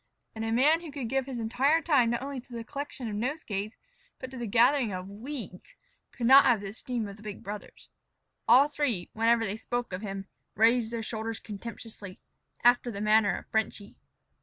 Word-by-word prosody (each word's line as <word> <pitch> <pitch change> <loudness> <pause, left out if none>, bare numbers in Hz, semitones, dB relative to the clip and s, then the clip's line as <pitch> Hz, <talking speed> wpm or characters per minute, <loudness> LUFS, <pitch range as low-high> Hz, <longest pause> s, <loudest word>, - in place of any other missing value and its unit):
And 220 - -5
a 225 - -1
man 295 +8 +4
who 330 -3 -8
could 275 -5 -5
give 270 +1 0
his 260 -3 -5
entire 260 +7 +2
time 285 -8 +3
not 235 +2 -1
only 275 -2 -5
to 250 0 -16
the 230 -1 -5
collection 275 0 -6
of 215 - -4
nosegays 215 -4 -3 0.4
but 260 - -8
to 260 - -8
the 240 -1 -4
gathering 245 +2 +4
of 185 0 -5
weeds, 230 - -8 0.4
could 240 - -4
not 270 +3 +8
have 240 -6 +4
the 200 - -5
esteem 235 +1 -4
of 200 0 -9
the - - -16
big 210 -2 -8
brothers. 205 +1 -8 0.6
All 255 +5 +7
three, 270 -12 -2
whenever 230 +1 +3
they 200 +1 -3
spoke 240 -2 -3
of 185 - -4
him, 195 -2 -5 0.3
raised 225 +2 +4
their 230 -1 -4
shoulders 220 0 -4
contemptuously, 210 -2 -8 0.4
after 245 0 +4
the 200 -4 -5
manner 215 0 +4
of - - -9
"Frenchy." 220 -2 -2
230 Hz, 195 wpm, -29 LUFS, 215-260 Hz, 0.6 s, not